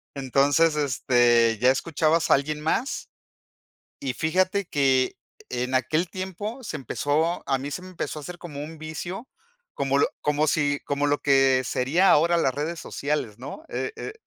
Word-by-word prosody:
Entonces 140 +4 +3
este, 120 -5 +3
ya 125 - +6
escuchabas 160 +3 +1
a - - +9
alguien 150 +2 -2
más. 225 - -1 0.9
Y 135 -2 -2
fíjate 185 +4 +1
que 135 -4 +2 0.3
en 125 +1 -2
aquel 155 +7 +1
tiempo 200 +6 -5
se 185 - -4
empezó 155 +4 -1
a 135 -1 +2
mí 140 +2 -5
se 165 - -4
me 185 - -10
empezó 170 -3 -4
a - - -8
hacer 175 +3 -8
como 145 -5 -7
un 160 +2 -8
vicio, 160 +8 -6 0.5
como 140 0 0
lo - - +4
como 150 +1 +1
si 145 -2 +1
como 145 0 0
lo 145 0 +2
que 135 -2 +4
sería 155 +11 +2
ahora 170 +3 +4
las 135 -6 +1
redes 160 +4 -3
sociales, 140 -7 -3
¿no? 140 - -8
Eh - - -3
eh, - - -6
150 Hz, 170 wpm, -25 LUFS, 135-170 Hz, 0.9 s, a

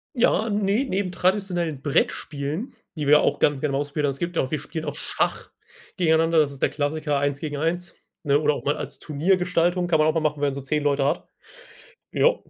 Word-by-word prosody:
Ja, 230 -2 +2
ne, 205 +3 +1
neben 190 -2 -1
traditionellen 180 -6 0
Brettspielen, 150 - -1 0.2
die 150 -2 -3
wir 150 +1 +7
auch - - +1
ganz 145 -2 +2
gerne 145 -1 -1
mal 135 - 0
ausprobiert 145 +1 -1
haben, - - +1
es 135 - -10
gibt 170 +1 -3
auch 130 - 0
wir 155 - -1
spielen 155 +2 -6
auch 145 -2 -4
Schach - - -2 0.5
gegeneinander, 165 -1 +3
das 150 -2 +3
ist 135 - -11
der - - +3
Klassiker 150 0 -1
eins 145 0 -1
gegen 150 -2 -4
eins, 170 +3 -2 0.3
ne? 145 -2 +3
Oder 150 -1 +2
auch - - -7
mal 145 - +1
als - - -6
Turniergestaltung, 175 +2 +1
kann 165 -2 +2
man 155 0 +4
auch 155 - +2
mal 165 - +1
machen, 150 -1 -1
wenn 145 - +2
man 140 - -2
so 140 - -5
10 150 +3 -1
Leute 140 -1 +1
hat. 140 - -1 0.8
Ja, - - +3
155 Hz, 220 wpm, -24 LUFS, 145-175 Hz, 0.8 s, wir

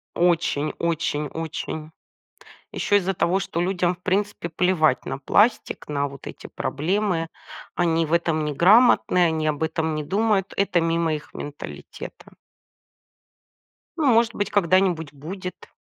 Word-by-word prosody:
Очень 165 -4 +1
очень 160 -3 -1
очень. 160 0 -5 0.8
Еще 205 - +1
из-за 195 -1 +1
того, 185 +3 +1
что 170 - -3
людям 180 -1 +1
в 180 - -24
принципе 195 -2 -1
плевать 160 -5 +2
на 135 - -3
пластик, 210 - +1
на 145 -1 -1
вот 140 -1 -12
эти - - -8
проблемы. 170 +2 -1 0.5
Они 165 -2 +2
в 155 - -6
этом 165 -2 +1
неграмотны, 180 - +4
они 160 -1 0
об 150 +1 -2
этом 160 0 -1
не 155 - -2
думают. 200 +1 +1
Это 195 -3 +2
мимо 165 -1 +1
их 150 - -8
менталитета. 145 0 -9 1.7
Ну 310 - 0
может 230 -1 +4
быть, 205 - -2
когда-нибудь 180 -5 +2
будет. 180 +6 -8
170 Hz, 130 wpm, -23 LUFS, 155-190 Hz, 1.7 s, неграмотны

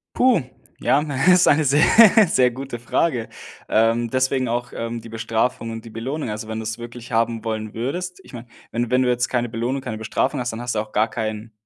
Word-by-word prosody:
Puh, 250 - +4 0.4
ja, 145 - +3
hm, 150 0 -5 0.2
ist 180 0 +5
eine 155 +2 +4
sehr, 145 +2 +4 0.4
sehr 125 -6 +3
gute 130 0 -7
Frage. 120 0 -1 0.4
Ähm, 115 +1 +2
deswegen 130 0 +1
auch, 120 +1 -3
ähm, 115 0 -4
die 115 - -12
Bestrafung 115 +1 -2
und 115 0 -7
die 115 - -10
Belohnung, 120 +4 -4
also 110 +1 -5
wenn 110 0 -4
du's 110 +1 -4
wirklich 120 0 -9
haben 115 0 0
wollen 110 -1 -4
würdest 180 +11 -4
ich - - -16
meine 120 -1 -9 0.3
wenn 120 0 -2
wenn 125 +1 +3
du 125 - +1
jetzt 125 0 +1
keine 120 -1 -1
Belohnung, 120 +4 -2
keine 110 -3 -5
Bestrafung 115 +5 -1
hast, 125 -1 -3
dann 115 - -6
hast 120 0 -3
du 105 - 0
auch 110 0 -7
gar 110 +2 +2
kein 110 0 -5
120 Hz, 215 wpm, -22 LUFS, 115-130 Hz, 0.4 s, ist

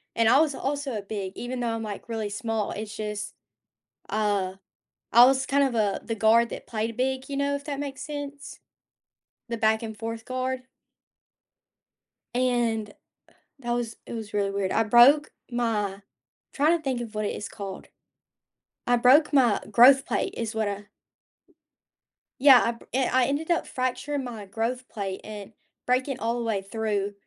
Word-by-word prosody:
And 230 -1 +3
I 260 - +6
was 300 -3 +2
also, 280 -1 -3
uh, 210 - -3
big, 200 -2 -5
even 250 +1 -5
though 235 -2 -1
I'm, 225 - -4
like, 210 +2 -7
really 220 -2 -3
small. 225 0 -2
It's 215 +1 -6
just, 210 -1 -5 0.7
uh, 200 -3 0 0.6
I 235 +3 +9
was 265 +1 +3
kind 280 0 +3
of 265 -3 -1
a 210 -3 +1
the 225 - -3
guard 225 +2 +4
that - - -7
played 225 0 -3
big, 260 +1 -1
you 280 - -4
know, 280 0 0
if 280 - -9
that 280 -2 -4
makes 275 -2 -5
sense? 290 -1 -7 0.9
The 235 - -2
back-and-forth 220 0 -1
guard. 255 0 -3 1.7
And, 240 -4 0 0.7
that 240 -3 -4
was 240 -1 -2
it - - -8
was 220 -3 -6
really 200 -1 0
weird. 195 -1 -1
I 225 - +3
broke 245 +7 +6 0.2
my 215 -5 -1 0.5
trying 310 +4 +3
to 320 - -15
think 260 -4 -1
of 225 -2 -8
what 215 0 -1
it - - -2
is 205 - -5
called. 195 -2 -8 1.0
I 245 - +4
broke 260 +7 +5
my 250 -7 +4
growth 260 +5 +7
plate, - - -2
is 225 -2 -3
what 220 -1 0
I 205 0 -5 1.5
Yeah, 265 -2 +8
I 235 - +1
br 230 - -14
and 260 0 +1
I 255 -1 +4
ended 290 +6 -1
up 340 - +1
fracturing 265 +2 -2
my 230 -5 -7
growth 230 +5 -3
plate 195 -3 -5
and 210 0 -9 0.3
breaking 255 +1 0
all 230 +1 -1
the 235 - -3
way 215 -4 0
through 205 0 -2
235 Hz, 170 wpm, -26 LUFS, 215-260 Hz, 1.7 s, I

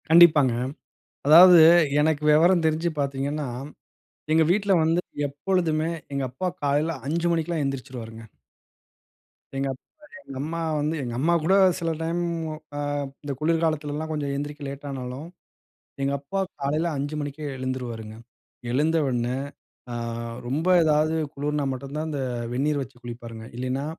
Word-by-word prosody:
கண்டிப்பாங்க. 160 -6 +7 0.7
அதாவது 175 +3 +9 0.4
எனக்கு 150 -1 +1
வெவரம் 170 +3 +5
தெரிஞ்சு 160 +2 +1
பாத்தீங்கன்னா, 140 +1 -2 0.9
எங்க 160 +1 +5
வீட்ல 200 0 +1
வந்து 165 +2 +2 0.3
எப்பொழுதுமே, 160 +1 0 0.2
எங்க 140 0 -1
அப்பா 135 +9 -3 0.2
காலையில 145 +2 +1
5 170 +4 0
மணிக்கெல்லாம் 165 -1 -1
எந்திரிச்சுருவாருங்க. 125 -4 -6 1.3
எங்க 135 0 0
அப்பா, 130 - -19 0.3
எங்க 135 - -8
அம்மா 165 +3 -3 0.2
வந்து 150 +2 0
எங்க 120 -2 -4
அம்மா 165 +5 +2
கூட 190 +5 +4 0.2
சில 165 -1 -1
டைம் 165 +2 -1 0.6
அ - - -2 0.4
இந்த 145 -1 -3
குளிர்காலத்துலலாம் 155 -1 0
கொஞ்சம் 145 -2 -2
எந்திரிக்க 145 +1 -5
லேட்டானாலும், 135 0 -6 0.7
எங்க 135 0 0
அப்பா 145 +8 -4 0.2
காலையில 150 +4 0
5 145 +2 -3
மணிக்கே 145 +1 -5
எழுந்துருவாருங்க. 120 -4 -5 0.6
எழுந்த 155 +6 +2
உடனே, 120 -1 -1 0.6
அ - - -4 0.5
ரொம்ப 150 +7 -1 0.2
எதாவது 155 +1 +2 0.2
குளிர்னா 145 +1 -1
மட்டும் 135 +2 -7
தான் 155 +1 -2
இந்த 145 -3 -3 0.3
வெந்நீர் 145 +3 0
வச்சு 125 -2 -8
குளிப்பாருங்க. 115 -2 -8
இல்லைன்னா, 130 +2 -2
145 Hz, 130 wpm, -25 LUFS, 135-160 Hz, 1.3 s, அதாவது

